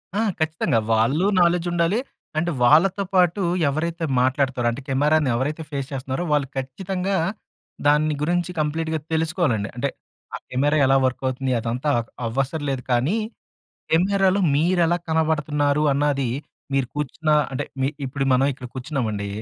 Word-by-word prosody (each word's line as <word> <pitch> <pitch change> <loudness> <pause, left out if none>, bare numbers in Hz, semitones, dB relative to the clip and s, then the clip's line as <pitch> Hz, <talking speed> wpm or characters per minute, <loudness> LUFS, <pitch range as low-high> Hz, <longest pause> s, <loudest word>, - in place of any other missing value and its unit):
ఆ! - - +1 0.2
ఖచ్చితంగా. 160 -7 +1
వాళ్ళు 130 - +2 0.2
నాలెడ్జ్ 175 0 +2
ఉండాలి, 175 +6 +1 0.4
అండ్ 170 +2 +1
వాళ్ళతో 175 +10 +4
పాటు 180 +2 +3 0.3
ఎవరైతే 165 +3 -2 0.2
మాట్లాడుతారో, 130 -1 +1
అంటే 130 +4 -6
కెమెరాని 145 +2 +2
ఎవరైతే 150 +6 -2
ఫేస్ 140 -2 -3
చేస్తున్నారో 135 +4 -3
వాళ్ళు 145 -2 +1
ఖచ్చితంగా 185 +9 -2 0.7
దాన్ని 150 +1 +3
గురించి 175 +3 0
కంప్లీట్‌గా 160 +1 -1
తెలుసుకోవాలండి. 155 - 0
అంటే, 135 +3 -1 0.5
ఆ - - -3
కెమెరా 145 +4 +1
ఎలా 135 +1 +4
వర్క్ 130 - -1
అవుతుంది 130 0 -2
అదంతా 120 +6 -2 0.4
అవసరలేదు 135 +2 -2
కానీ 130 - +2 0.7
కెమెరాలో 195 +3 +3 0.2
మీరెలా 175 +2 +2
కనబడుతున్నారు 150 -2 +1
అన్నది 140 -3 +1 0.4
మీరు 135 -3 +1
కూర్చున్న 150 +2 -3 0.2
అంటే 130 - -2 0.2
మీ 135 - +2 0.2
ఇప్పుడు 135 +1 -2
మనం 130 +2 +3
ఇక్కడ 125 -1 -9
కూర్చున్నామండి, 125 -7 -3
150 Hz, 130 wpm, -23 LUFS, 130-165 Hz, 0.7 s, వాళ్ళతో